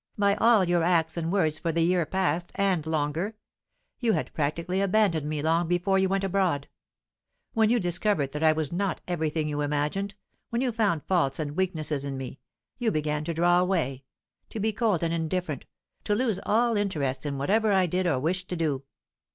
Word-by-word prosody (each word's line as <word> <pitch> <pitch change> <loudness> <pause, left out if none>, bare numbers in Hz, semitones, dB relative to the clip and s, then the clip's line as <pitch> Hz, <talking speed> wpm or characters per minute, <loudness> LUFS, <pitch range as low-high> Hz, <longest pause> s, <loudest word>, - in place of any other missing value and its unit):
"By 200 -1 +3
all 225 -2 +5
your 175 -1 +2
acts 165 -1 +2
and 170 -1 -2
words 160 -6 +1
for 165 - -1
the 165 +1 +1
year 175 -2 +2
past, 175 -1 -1
and 185 -6 +1
longer. 160 +7 -1 0.6
You 230 -3 +2
had - - -2
practically 170 +5 -1
abandoned 190 -7 +2
me 150 -1 -2
long 165 +2 +2
before 175 +3 +2
you 190 0 +2
went 195 0 0
abroad. 185 -7 0 0.9
When 220 -1 +3
you 240 +1 +3
discovered 175 -5 0
that 150 - -5
I 160 -1 +6
was 155 -2 -1
not 185 0 -1
everything 160 -3 -1
you 150 -1 -2
imagined, 150 +8 -1 0.3
when 235 +2 -1
you 255 - +1
found 205 -9 0
faults 165 -8 +1
and 150 -2 -4
weaknesses 155 -6 -1
in 140 -1 -4
me, 130 0 -7 0.4
you 240 -2 +1
began 150 -4 -1
to 170 - -2
draw 175 +2 +4
away, 160 -8 0 0.5
to 220 - -6
be 220 +1 0
cold 210 -6 +1
and 165 0 0
indifferent, 165 -3 -2 0.4
to 205 - +1
lose 225 -4 0
all 230 +1 +3
interest 155 -11 -1
in 145 -2 -3
whatever 210 +10 +2
I 190 -2 +4
did 180 +2 0
or 145 -7 +1
wished 180 +6 -1
to 180 - -2
do. 155 -5 -1
175 Hz, 190 wpm, -27 LUFS, 155-195 Hz, 0.9 s, I